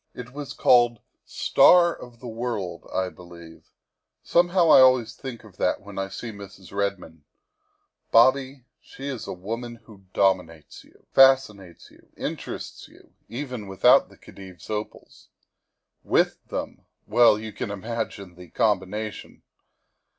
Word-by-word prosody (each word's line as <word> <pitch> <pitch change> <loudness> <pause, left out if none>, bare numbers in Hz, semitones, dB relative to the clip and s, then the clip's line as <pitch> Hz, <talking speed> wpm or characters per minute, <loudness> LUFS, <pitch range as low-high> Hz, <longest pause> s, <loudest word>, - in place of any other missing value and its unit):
It 125 0 -9
was 145 -1 -7
called 120 -1 +4 0.3
'Star 175 -1 +4
of 120 -1 -14
the 125 - -8
World,' 110 -8 -5
I 95 -1 -1
believe; 85 -2 -15 0.5
somehow 175 -1 +3
I - - +9
always 130 -3 +4
think 125 -2 -9
of 100 -4 -17
that 90 - 0
when 100 -1 -9
I 95 - -2
see 115 +3 -7
Mrs. 100 -3 -13
Redmond. 100 -6 -3 0.9
Bobby, 130 +2 +3 0.2
she 135 - -10
is 130 -4 -5
a - - -5
woman 115 +6 -6
who 100 -4 -17
dominates 90 -5 -1
you, - - -25
fascinates 110 -10 +3
you, - - -23
interests - - -6
you, - - -21 0.2
even 125 -4 -6
without 95 -1 +4
the - - -19
Khedive's 95 -1 -13
opals. 105 0 -7 0.8
With - - +1
them, - - -6 0.2
well 120 -3 +5
you 110 0 -8
can - - -5
imagine 100 -2 -5
the 90 0 -14
combination. 105 +2 -2
110 Hz, 135 wpm, -24 LUFS, 95-125 Hz, 0.9 s, I